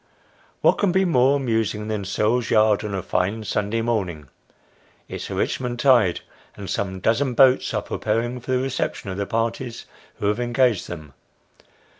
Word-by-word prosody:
What - - +4
can 200 -3 +2
be 190 +1 +2
more 135 -5 +4
amusing 110 -5 -1
than 105 -2 -3
Searle's 110 +5 0
yard 110 -1 +3
on 105 -2 -3
a 95 - -3
fine 100 +5 -1
Sunday 105 +2 -1
morn 110 -6 0
ing? 75 -5 -10 0.8
It's - - -6
a - - -4
Richmond 125 -1 -2
tide, 120 -9 +4 0.3
and 100 - -8
some 95 0 -3
dozen 125 +5 +1
boats 130 0 +5
are - - -1
preparing 115 +3 -2
for 125 - -6
the - - +3
reception 130 -6 -3
of 95 - -5
the 100 -1 -2
parties 115 +1 -3 0.3
who - - -5
have 105 +3 +1
engaged 120 -3 +1
them. 75 -5 -9
115 Hz, 170 wpm, -23 LUFS, 100-125 Hz, 0.8 s, boats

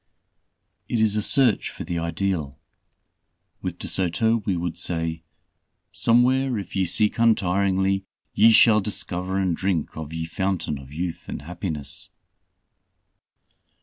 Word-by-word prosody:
It 120 - 0
is 110 -1 +2
a 105 - +1
search 125 -1 +3
for - - -8
the 85 +1 -3
ideal. 85 -3 -2 1.0
With - - -4
De - - -6
Soto 95 +5 +1
we 95 -3 +1
would 85 -1 -3
say, 80 -2 -2 0.7
"Somewhere, 125 +2 +3
if 100 - -6
ye 95 -1 +2
seek 105 +6 +1
untiringly, 95 -3 +2 0.3
ye 115 +2 +6
shall 110 -1 +6
discover 95 -2 -3
and 95 -3 +1
drinke 90 -3 -1
of 80 -1 -6
ye 80 0 -3
Fountaine 85 -4 -2
of 65 0 -13
Youth 85 +2 -5
and - - -6
Happiness." 80 -4 -5
95 Hz, 130 wpm, -24 LUFS, 85-105 Hz, 1.0 s, ye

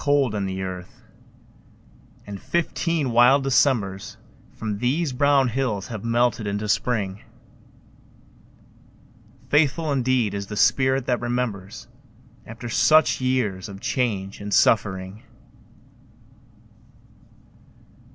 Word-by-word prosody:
Cold 140 -5 +2
in 100 -2 -2
the 95 0 -4
earth, 90 -1 -8 1.2
and 100 -1 -8
fifteen 165 -1 -1
wild 125 +4 +5
Decembers 120 -8 +1 0.3
From 105 -2 -5
these 135 +5 0
brown 140 0 +3
hills 115 -5 -2
have 110 -4 -6
melted 115 -2 +1
into 105 +1 -3
Spring. 105 -3 -1 2.3
Faithful 150 +1 +2
indeed 130 -5 +1
is 100 -1 -4
the 105 - -6
spirit 130 +3 +2
that 125 -2 0
remembers 120 -3 -4 0.6
After 115 +1 -8
such 155 +5 +3
years 115 -7 -1
of 100 -1 -9
change 100 -6 -2
and 100 0 -6
suffering! 95 -1 +1
120 Hz, 100 wpm, -23 LUFS, 100-130 Hz, 2.3 s, wild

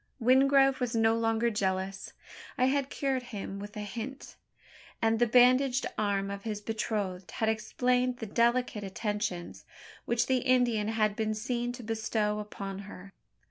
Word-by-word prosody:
Wingrove 270 +2 +4
was 245 -2 -1
no 225 0 +4
longer 230 +1 +1
jealous. 195 -1 -2 0.4
I 255 - +3
had 275 +1 +1
cured 270 -3 -1
him 200 -4 -6
with 205 +1 -8
a - - -3
hint; 230 +6 -7 0.6
and 225 0 +2
the 240 - +4
bandaged 255 +2 +4
arm 200 -1 0
of 200 0 -5
his 210 -1 -4
betrothed 210 -4 -3
had 220 - 0
explained 250 +3 0
the 225 - -5
delicate 235 0 +1
attentions, 205 -2 -3 0.4
which 235 0 +1
the 260 - +2
Indian 245 -4 +2
had 215 -2 +1
been 215 -1 -1
seen 240 +2 -2
to 245 0 -9
bestow 215 -1 -1
upon 195 -2 -6
her. 195 +1 -11
225 Hz, 150 wpm, -30 LUFS, 210-250 Hz, 0.6 s, Wingrove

